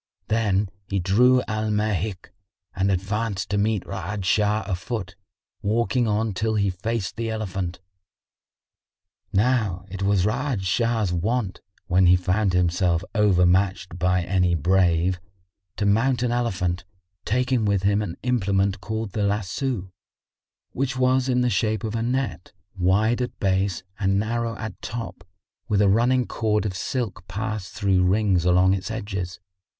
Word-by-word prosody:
Then 105 -3 +1 0.2
he 100 - 0
drew 125 +8 +4
Al 110 0 -1
Mahik 105 -2 -1 0.4
and 95 +1 +1
advanced 100 +1 -2
to 100 - +1
meet 105 -1 +1
Ra'ad 100 0 -4
Shah 105 +3 +2
a 100 - -2
foot, 95 -1 -4 0.5
walking 115 +3 +1
on 110 0 0
till 110 +3 -1
he 100 -2 +2
faced 105 +3 -3
the 115 0 -2
elephant. 95 -5 -3 1.5
Now 105 -4 +1
it 95 0 -6
was 100 -2 +2
Ra'ad 125 -1 -1
Shah's 110 +1 +1
wont, 100 +3 -1 0.2
when 90 0 +3
he 90 - +7
found 90 +2 +1
himself 90 0 +2
overmatched 95 -3 +2
by 90 0 +2
any 90 -1 +2
brave, 90 +1 +2 0.6
to 105 - 0
mount 120 +5 +2
an 120 - +1
elephant, 95 -7 -1 0.4
taking 125 +1 +1
with 100 -2 +1
him 100 +1 +2
an 95 -5 -5
implement 100 -5 +1
called 110 +2 -4
the 105 - -2
lasso,[FN#58] 100 +1 -1 0.8
which 130 0 -2
was 130 0 +2
in 125 -1 +2
the 125 - +2
shape 110 +1 0
of 110 -1 -3
a 115 - -1
net, 120 - -2 0.2
wide 105 +6 +2
at 125 - -4
base 95 -1 0 0.2
and 95 -1 +2
narrow 115 +2 -1
at 110 -4 -7
top 115 -6 -6 0.4
with 105 -2 +1
a 105 - +4
running 120 +4 +3
cord 105 -2 0
of 95 -3 -2
silk 105 -4 -3
passed 105 0 -4
through 95 -3 +2
rings 95 -1 +2
along 90 +1 +4
its 95 +1 -3
edges. 95 -5 -4
100 Hz, 145 wpm, -24 LUFS, 95-115 Hz, 1.5 s, he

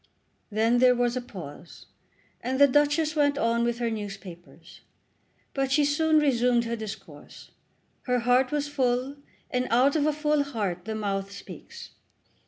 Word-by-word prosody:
Then 225 +3 +2
there 250 0 +5
was 245 0 0
a 255 - -2
pause, 175 -8 -11 0.6
and 255 +2 -2
the 285 - +9
Duchess 295 +3 +2
went 285 -2 +2
on 235 -2 +1
with 235 0 0
her 235 -1 -1
newspapers; 195 -5 -9 0.7
but 270 -1 -1
she 290 +1 +3
soon 310 +2 +2
resumed 245 -5 +2
her 230 0 -2
discourse. 205 -9 -10 0.6
Her 250 -1 +1
heart 250 +2 +2
was 295 -1 -1
full, 260 -1 -1 0.3
and 250 0 0
out 255 +5 +3
of 300 -1 +2
a - - +3
full 300 0 +1
heart 205 -10 -3
the 220 - -4
mouth 200 -2 -3
speaks. 470 - -11
245 Hz, 155 wpm, -26 LUFS, 220-285 Hz, 0.7 s, the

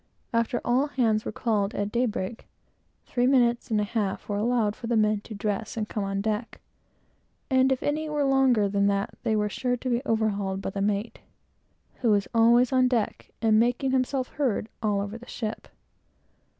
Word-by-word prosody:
After 230 +1 +1
all 255 +4 +2
hands 225 -6 +1
were - - -3
called, 210 -3 -1
at 205 0 -2
day 245 +2 +1
break, 215 +1 -5 0.6
three 245 0 +1
minutes 240 -3 +3
and 215 -2 +1
a - - +1
half 205 -2 -2
were 205 - -2
allowed 220 -1 +1
for 235 - -7
every 235 -1 +1
man 215 -1 +2
to 215 - -9
dress 210 +2 -3
and 215 -1 -2
come 210 - -3
on 195 0 -2
deck, 215 +2 -3 0.9
and 260 0 +4
if 260 - 0
any 305 +1 -1
were 295 -1 0
longer 265 -6 +3
than 200 0 +1
that, 200 0 -1
they 225 -3 0
were 210 0 +1
sure 245 +4 -1
to 255 - -4
be 240 0 +1
overhauled 205 -5 0
by 195 - -4
the 195 - -4
mate, 205 +2 -1 0.8
who 240 - 0
was 205 -2 +2
always 235 +2 +5
on 255 -1 +4
deck, 240 -4 -1
and 220 -1 +5
making 245 +3 +1
himself 260 0 0
heard 245 -6 -1
all 205 -2 +1
over 205 +3 -5
the 245 - -14
ship. 220 -2 -5
225 Hz, 190 wpm, -26 LUFS, 210-250 Hz, 0.9 s, always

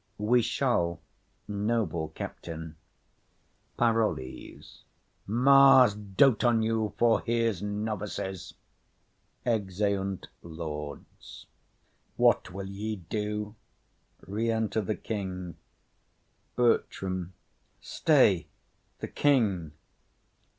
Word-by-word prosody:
We 120 +4 +3
shall, 100 - 0 0.5
noble 105 -5 -1
captain. 80 0 -7 1.0
PAROLLES. 115 - -2 0.4
Mars 130 +1 +6
dote 105 +5 +2
on 120 -2 +3
you 110 -2 -1
for 115 -1 +3
his 115 -5 0
novices! 105 -2 -4 0.9
[Exeunt 100 -3 -1
Lords.] 75 -3 -8 0.7
What - - +3
will 100 +2 -6
ye 105 +3 -4
do? 105 +3 -4 0.7
BERTRAM. 105 -3 -2 2.3
Stay - - +3 0.5
the - - -3
king. 105 - +1
105 Hz, 65 wpm, -28 LUFS, 95-115 Hz, 2.3 s, Mars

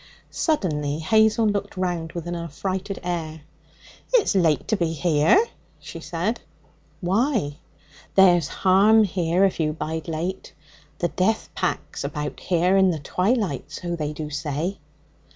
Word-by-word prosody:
Suddenly 150 - 0
Hazel 220 +6 +3
looked 205 -2 -1
round 175 -3 -2
with 170 -2 -5
an 175 - -4
affrighted 185 +4 -4
air. 160 -3 -4 0.7
'It's - - +3
late 170 -6 +2
to 220 - +3
be 170 -4 -1
here,' 165 - +3 0.3
she - - -9
said. 180 +7 -2 0.6
'Why?' 195 - 0 0.6
'There's 175 -5 +6
harm 200 +4 +4
here 180 -2 +1
if 190 - -1
you 155 -1 +1
bide 160 +1 -4
late. 170 +4 -4 0.4
The 175 - 0
jeath 215 +4 0
pack's - - -3
about 150 -1 -4
here 180 +1 +2
in 190 -1 +5
the 170 - 0
twilight, 180 - -1
so 175 +1 -4
they 150 -2 -3
do 150 0 -6
say.' 155 +6 -3
175 Hz, 135 wpm, -24 LUFS, 160-195 Hz, 0.7 s, There's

